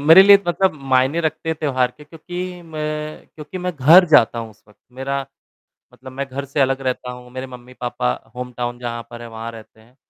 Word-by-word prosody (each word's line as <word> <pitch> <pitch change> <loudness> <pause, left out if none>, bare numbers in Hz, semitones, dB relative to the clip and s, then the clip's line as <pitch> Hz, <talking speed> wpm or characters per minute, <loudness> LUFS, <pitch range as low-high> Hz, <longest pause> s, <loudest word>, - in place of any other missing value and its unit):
मेरे 160 +6 +9
लिए 200 0 +9
मतलब 190 +2 +2 0.2
मायने 130 +6 +3
रखते 160 +1 -2
हैं, 160 - 0
त्योहार 130 -4 +1
के 150 - -14
क्योंकि 175 +3 -7
मैं 155 -1 -5
क्योंकि 155 +4 -8
मैं 180 0 -2
घर 160 +8 +8
जाता 120 -6 +5
हूँ 115 -1 -5
उस 105 - -23
वक़्त, 105 - -22
मेरा 135 +2 -3 0.7
मतलब, 130 0 -12
मैं 140 +2 -4
घर 140 +2 -5
से 140 +1 -3
अलग 135 0 +1
रहता 130 -1 -2
हूँ, 125 0 -11
मेरे 130 +1 -6
मम्मी-पापा 125 - -4 0.2
होम 125 0 -5
टाउन 120 0 -3
जहाँ 120 -1 -4
पर 120 0 -9
हैं, 120 - -8
वहाँ 115 0 -7
रहते 110 -1 -14
हैं, 120 +3 -24
135 Hz, 210 wpm, -20 LUFS, 125-155 Hz, 0.7 s, मेरे